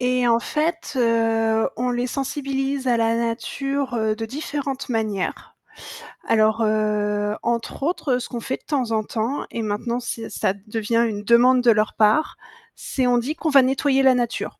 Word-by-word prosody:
et 250 Hz, -1 st, +1 dB
en 230 Hz, -, +4 dB
fait, 315 Hz, +5 st, -2 dB
heu, 225 Hz, -2 st, +2 dB
on 250 Hz, +1 st, -1 dB
les 245 Hz, 0 st, -1 dB
sensibilise 270 Hz, 0 st, -3 dB
à 245 Hz, -2 st, +3 dB
la 230 Hz, 0 st, +1 dB
nature, 260 Hz, +3 st, -2 dB
heu, 220 Hz, -1 st, 0 dB
de 225 Hz, -, -4 dB
différentes 280 Hz, +1 st, -4 dB
manières. 215 Hz, -5 st, -3 dB, 0.7 s
Alors, 220 Hz, 0 st, +3 dB
heu, 210 Hz, -1 st, 0 dB
entre 235 Hz, +3 st, -2 dB
autres, 280 Hz, -6 st, 0 dB
ce 240 Hz, -, -7 dB
qu'on 240 Hz, -, -4 dB
fait 260 Hz, +3 st, -3 dB
de -, -, -34 dB
temps 260 Hz, -6 st, -1 dB
en 220 Hz, -1 st, +1 dB
temps 230 Hz, +6 st, -3 dB
et 230 Hz, -, -3 dB
maintenant 220 Hz, +3 st, -2 dB
c'est 230 Hz, -1 st, -5 dB
ça 190 Hz, -, 0 dB
devient 225 Hz, +2 st, 0 dB
une 205 Hz, -2 st, -4 dB
demande 245 Hz, +3 st, +5 dB
de 245 Hz, -1 st, +5 dB
leur 215 Hz, 0 st, +1 dB
part, 220 Hz, +9 st, +2 dB, 0.4 s
c'est 260 Hz, -2 st, -2 dB
on 245 Hz, 0 st, +3 dB
dit 270 Hz, +6 st, -2 dB
qu'on 320 Hz, -, -2 dB
va 280 Hz, -2 st, +7 dB
nettoyer 270 Hz, +1 st, +2 dB
la 265 Hz, -1 st, +6 dB
nature. 240 Hz, -1 st, -2 dB
240 Hz, 175 wpm, -22 LUFS, 225-270 Hz, 0.7 s, va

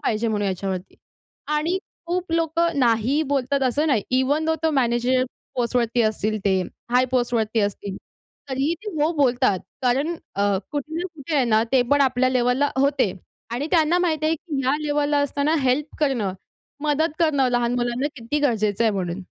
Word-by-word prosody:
पाहिजे 225 Hz, +1 st, 0 dB
म्हणून 205 Hz, -2 st, 0 dB
याच्यावरती. 190 Hz, 0 st, -4 dB, 0.5 s
आणि 310 Hz, +5 st, 0 dB, 0.3 s
खूप 350 Hz, -1 st, -2 dB
लोकं 330 Hz, -1 st, +1 dB
नाही 245 Hz, +4 st, +2 dB
बोलतात 275 Hz, 0 st, 0 dB
असं 285 Hz, +5 st, +1 dB
नाही. 255 Hz, -9 st, +2 dB
इव्हन 285 Hz, +5 st, +1 dB
तो 320 Hz, -, +3 dB
मॅनेजर 255 Hz, -1 st, +2 dB, 0.3 s
पोस्टवरती 240 Hz, -1 st, +1 dB
असतील, 215 Hz, 0 st, 0 dB
ते 190 Hz, -2 st, +3 dB, 0.3 s
हाय 250 Hz, +1 st, +4 dB
पोस्टवरती 235 Hz, -3 st, +1 dB
असतील. 200 Hz, -1 st, -3 dB, 0.5 s
तरीही 270 Hz, +5 st, 0 dB
ते 420 Hz, -, -5 dB
हो 310 Hz, +3 st, +2 dB
बोलतात 250 Hz, -7 st, +2 dB, 0.2 s
कारण 275 Hz, +7 st, +1 dB, 0.2 s
अ, 200 Hz, 0 st, +2 dB, 0.2 s
कुठे 295 Hz, +1 st, -4 dB
ना, 360 Hz, -, -2 dB
कुठे 305 Hz, +1 st, -5 dB
आहे 270 Hz, -, +3 dB
ना 220 Hz, -2 st, +3 dB
ते 260 Hz, -2 st, +5 dB
पण 285 Hz, -, +4 dB
आपल्या 255 Hz, -1 st, +3 dB
लेव्हलला 255 Hz, +2 st, +2 dB
होते 270 Hz, -8 st, +2 dB, 0.4 s
आणि 245 Hz, +5 st, -2 dB
त्यांना 335 Hz, 0 st, +3 dB
माहिती 315 Hz, -3 st, 0 dB
आहे, 320 Hz, -, +2 dB
की 295 Hz, -4 st, -4 dB
ह्या 265 Hz, +3 st, +2 dB
लेव्हलला 290 Hz, 0 st, +1 dB
असताना 290 Hz, +4 st, 0 dB
हेल्प 270 Hz, +4 st, 0 dB
करणं, 240 Hz, -10 st, +1 dB, 0.5 s
मदत 300 Hz, +1 st, +1 dB
करणं 285 Hz, -6 st, +3 dB
लहान 240 Hz, 0 st, +1 dB
मुलांना 245 Hz, +2 st, 0 dB
किती 240 Hz, +4 st, -2 dB
गरजेचं 225 Hz, -5 st, +1 dB
आहे 220 Hz, -, +4 dB
म्हणून. 185 Hz, -1 st, -3 dB
260 Hz, 165 wpm, -23 LUFS, 235-295 Hz, 0.5 s, ते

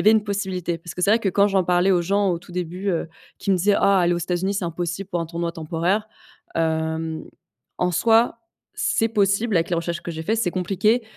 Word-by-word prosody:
avait 215 Hz, -, +6 dB
une 220 Hz, -1 st, +3 dB
possibilité. 190 Hz, -4 st, -2 dB
Parce 165 Hz, 0 st, -9 dB
que 180 Hz, -, -4 dB
c'est 200 Hz, -, +4 dB
vrai 225 Hz, -, +5 dB
que, 210 Hz, -, -1 dB
quand 200 Hz, +2 st, +4 dB
j'en 195 Hz, -2 st, +2 dB
parlais 180 Hz, +2 st, +3 dB
aux 180 Hz, -2 st, +4 dB
gens, 200 Hz, +2 st, +1 dB
au 170 Hz, -, -1 dB
tout 175 Hz, -, -16 dB
début, 180 Hz, +2 st, -3 dB
heu, 170 Hz, -3 st, -1 dB, 0.3 s
qui -, -, -2 dB
me 190 Hz, -, +4 dB
disaient: 200 Hz, +3 st, +3 dB
«Ah 200 Hz, -1 st, +4 dB
aller 175 Hz, 0 st, +3 dB
aux 175 Hz, -, -1 dB
États-Unis, 180 Hz, +3 st, -1 dB
c'est 195 Hz, -, -2 dB
impossible 175 Hz, +2 st, -3 dB
pour 175 Hz, -, -1 dB
un 165 Hz, -, -3 dB
tournoi 170 Hz, +1 st, -3 dB
temporaire» 170 Hz, +7 st, -1 dB, 0.5 s
hem, 160 Hz, 0 st, -1 dB, 0.6 s
en 180 Hz, -, +1 dB
soi, 225 Hz, +6 st, +3 dB, 0.4 s
c'est 225 Hz, -, +1 dB
possible 205 Hz, 0 st, +1 dB
avec 165 Hz, -, +1 dB
les 175 Hz, -, +1 dB
recherches 170 Hz, 0 st, -3 dB
que 170 Hz, -, -5 dB
j'ai 160 Hz, -1 st, -5 dB
fait. 220 Hz, +7 st, 0 dB
C'est 220 Hz, -5 st, +1 dB
compliqué, 195 Hz, +6 st, +1 dB
180 Hz, 230 wpm, -23 LUFS, 170-200 Hz, 0.6 s, avait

